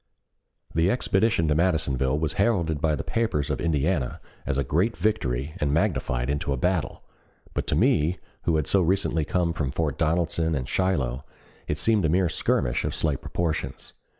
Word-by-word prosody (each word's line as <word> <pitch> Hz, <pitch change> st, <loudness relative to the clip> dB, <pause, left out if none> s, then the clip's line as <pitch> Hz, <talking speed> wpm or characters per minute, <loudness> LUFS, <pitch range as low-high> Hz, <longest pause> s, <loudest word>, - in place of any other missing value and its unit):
The 80 Hz, +3 st, +2 dB
expedition 100 Hz, -6 st, +2 dB
to 75 Hz, -, +3 dB
Madisonville 75 Hz, -5 st, +1 dB
was 80 Hz, 0 st, 0 dB
heralded 85 Hz, -9 st, +1 dB
by 80 Hz, -1 st, +2 dB
the -, -, -4 dB
papers 75 Hz, -, -1 dB
of 70 Hz, -, -2 dB
Indiana 75 Hz, -3 st, 0 dB, 0.3 s
as 70 Hz, -, 0 dB
a 70 Hz, -, +1 dB
great 90 Hz, -, 0 dB
victory 70 Hz, -, -1 dB
and 75 Hz, -1 st, +1 dB
magnified 70 Hz, -, 0 dB
into 70 Hz, 0 st, -1 dB
a 70 Hz, -, 0 dB
battle, 90 Hz, +3 st, -1 dB, 0.5 s
but -, -, -2 dB
to -, -, +1 dB
me 80 Hz, +5 st, +2 dB, 0.3 s
who 85 Hz, -, +2 dB
had 75 Hz, -2 st, +1 dB
so 95 Hz, -, +3 dB
recently 85 Hz, -2 st, +1 dB
come 85 Hz, 0 st, 0 dB
from 75 Hz, -5 st, -2 dB
Fort 75 Hz, 0 st, -2 dB
Donelson 80 Hz, 0 st, +1 dB
and 65 Hz, -3 st, -3 dB
Shiloh 70 Hz, -9 st, 0 dB, 0.4 s
it 75 Hz, -, -1 dB
seemed 110 Hz, +2 st, +2 dB
a 80 Hz, -, +2 dB
mere 90 Hz, +1 st, +2 dB
skirmish -, -, 0 dB
of -, -, -2 dB
slight 75 Hz, -4 st, 0 dB
proportions. 85 Hz, -3 st, -3 dB
80 Hz, 175 wpm, -25 LUFS, 70-90 Hz, 0.5 s, to